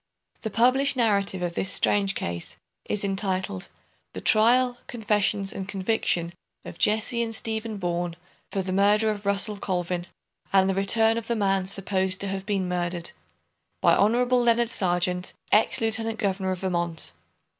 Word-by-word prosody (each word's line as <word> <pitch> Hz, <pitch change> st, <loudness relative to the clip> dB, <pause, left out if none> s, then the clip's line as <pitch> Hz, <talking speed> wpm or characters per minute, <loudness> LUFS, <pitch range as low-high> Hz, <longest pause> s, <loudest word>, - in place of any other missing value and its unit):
The 220 Hz, -, -3 dB
published 260 Hz, +6 st, +3 dB
narrative 200 Hz, -5 st, +1 dB
of 175 Hz, -1 st, -2 dB
this 190 Hz, -, -1 dB
strange 200 Hz, -1 st, +2 dB
case 85 Hz, 0 st, -4 dB, 0.3 s
is 205 Hz, -, -1 dB
entitled 190 Hz, -, -2 dB, 0.5 s
"The 95 Hz, -, -6 dB
Trial, 245 Hz, -, +4 dB
Confessions, 210 Hz, -3 st, 0 dB
and 190 Hz, -, -5 dB
Conviction 190 Hz, -4 st, -1 dB, 0.3 s
of -, -, -9 dB
Jesse 220 Hz, +3 st, +2 dB
and 225 Hz, -1 st, -1 dB
Stephen 220 Hz, -1 st, -3 dB
Boorn 175 Hz, -2 st, -2 dB, 0.4 s
for 195 Hz, -, -1 dB
the 185 Hz, 0 st, -3 dB
Murder 210 Hz, +3 st, +3 dB
of 205 Hz, -1 st, -6 dB
Russell 200 Hz, +1 st, 0 dB
Colvin, 180 Hz, -2 st, -2 dB, 0.4 s
and 190 Hz, -1 st, +4 dB
the 195 Hz, -, +1 dB
Return 220 Hz, +4 st, +2 dB
of 225 Hz, -, -11 dB
the 235 Hz, -, 0 dB
Man 195 Hz, -3 st, +1 dB
supposed 190 Hz, -1 st, 0 dB
to 200 Hz, -, -2 dB
have 195 Hz, 0 st, -5 dB
been 195 Hz, -3 st, 0 dB
murdered. 175 Hz, -1 st, -2 dB, 0.7 s
By -, -, +4 dB
Hon. 230 Hz, +5 st, +3 dB, 0.2 s
Leonard 235 Hz, 0 st, +2 dB
Sargeant, 180 Hz, -2 st, 0 dB, 0.2 s
Ex 215 Hz, -, +3 dB
Lieutenant 225 Hz, 0 st, -1 dB
Governor 195 Hz, -2 st, -1 dB
of 185 Hz, -1 st, -3 dB
Vermont. 170 Hz, -3 st, -1 dB
195 Hz, 155 wpm, -25 LUFS, 185-220 Hz, 0.7 s, Trial